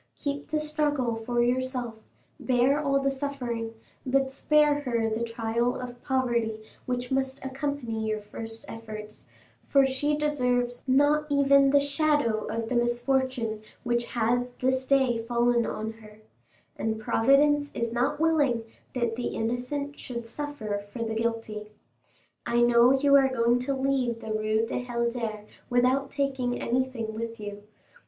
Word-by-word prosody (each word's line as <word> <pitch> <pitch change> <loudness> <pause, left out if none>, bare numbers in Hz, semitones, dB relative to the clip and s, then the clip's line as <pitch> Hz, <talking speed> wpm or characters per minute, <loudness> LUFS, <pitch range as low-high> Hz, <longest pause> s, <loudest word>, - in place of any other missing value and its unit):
Keep 285 0 -4
the 305 0 0
struggle 295 -5 0
for 240 +2 0
yourself, 250 -1 -1 0.5
bear 260 +3 +2
all 275 -1 +2
the 275 0 +1
suffering, 245 -5 -4 0.3
but 265 0 +1
spare 295 +1 +3
her 235 -5 0
the 220 +2 -1
trial 230 +1 -1
of 245 -1 -7
poverty 240 -5 0 0.3
which 250 0 -2
must 265 0 -1
accompany 265 -5 -3
your 215 0 -1
first 225 +2 -8
efforts; 215 -1 -8 0.4
for 275 -1 +5
she 290 +3 0
deserves 250 -5 0
not 290 +3 +3
even 280 -1 +5
the 285 +1 +5
shadow 285 -6 +1
of 230 0 -3
the 250 - -2
misfortune 240 -2 0 0.2
which 240 -1 0
has 245 +2 0
this 260 0 0
day 265 -4 +3
fallen 240 0 +2
on 220 +1 -3
her, 215 -1 -15 0.6
and 220 0 -1
Providence 285 +6 +3
is 235 0 -2
not 245 +4 0
willing 290 -8 +2 0.3
that 235 -2 0
the 245 +1 -2
innocent 250 +5 -3
should 235 -2 -6
suffer 230 -6 -4
for 230 +2 -3
the 225 -1 -2
guilty. 220 -2 -3 0.7
I 240 0 +1
know 240 +1 +6
you 280 +1 +4
are 270 -1 +4
going 240 -1 +2
to 270 +2 -1
leave 265 -3 0
the 220 - -6
Rue 215 +1 +1
du 235 - -3
Helder 235 -3 -2 0.3
without 255 +2 +2
taking 265 -3 -1
anything 245 -3 -1
with 230 +1 -5
you. 205 -1 -7
245 Hz, 145 wpm, -27 LUFS, 230-275 Hz, 0.7 s, know